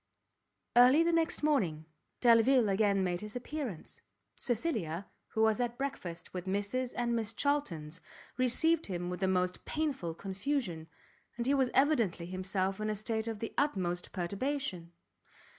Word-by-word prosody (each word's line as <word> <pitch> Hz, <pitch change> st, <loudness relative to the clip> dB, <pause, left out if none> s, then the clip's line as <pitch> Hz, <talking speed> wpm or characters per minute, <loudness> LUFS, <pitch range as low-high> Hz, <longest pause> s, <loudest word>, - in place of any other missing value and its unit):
Early 255 Hz, +6 st, +7 dB
the 340 Hz, -, +2 dB
next 330 Hz, -2 st, +1 dB
morning, 180 Hz, -, +1 dB, 0.4 s
Delvile 235 Hz, 0 st, +5 dB
again 200 Hz, -1 st, +2 dB
made 180 Hz, -1 st, -1 dB
his 210 Hz, +1 st, -7 dB
appearance. 245 Hz, -, -5 dB, 0.3 s
Cecilia, 215 Hz, -, -2 dB, 0.2 s
who 220 Hz, -, 0 dB
was 220 Hz, +2 st, +3 dB
at 240 Hz, 0 st, -2 dB
breakfast 185 Hz, -12 st, -5 dB
with 180 Hz, 0 st, -5 dB
Mrs 205 Hz, +6 st, -1 dB
and 235 Hz, -1 st, +1 dB
Miss 225 Hz, -2 st, -1 dB
Charltons, 180 Hz, -, -1 dB, 0.3 s
received 300 Hz, +6 st, +2 dB
him 175 Hz, -2 st, -3 dB
with 180 Hz, -, -4 dB
the 190 Hz, -, +1 dB
most 180 Hz, -1 st, 0 dB
painful 275 Hz, -, -2 dB
confusion, 195 Hz, -, -3 dB, 0.5 s
and 235 Hz, -, -2 dB
he 270 Hz, -, +3 dB
was 265 Hz, -3 st, +3 dB
evidently 235 Hz, -, +2 dB
himself 185 Hz, +2 st, -2 dB
in 215 Hz, -, -1 dB
a 215 Hz, -, 0 dB
state 220 Hz, +2 st, -2 dB
of 225 Hz, -1 st, -3 dB
the 225 Hz, +2 st, -5 dB
utmost 180 Hz, -11 st, -1 dB
perturbation. 190 Hz, -1 st, -3 dB
215 Hz, 145 wpm, -32 LUFS, 185-260 Hz, 0.5 s, Early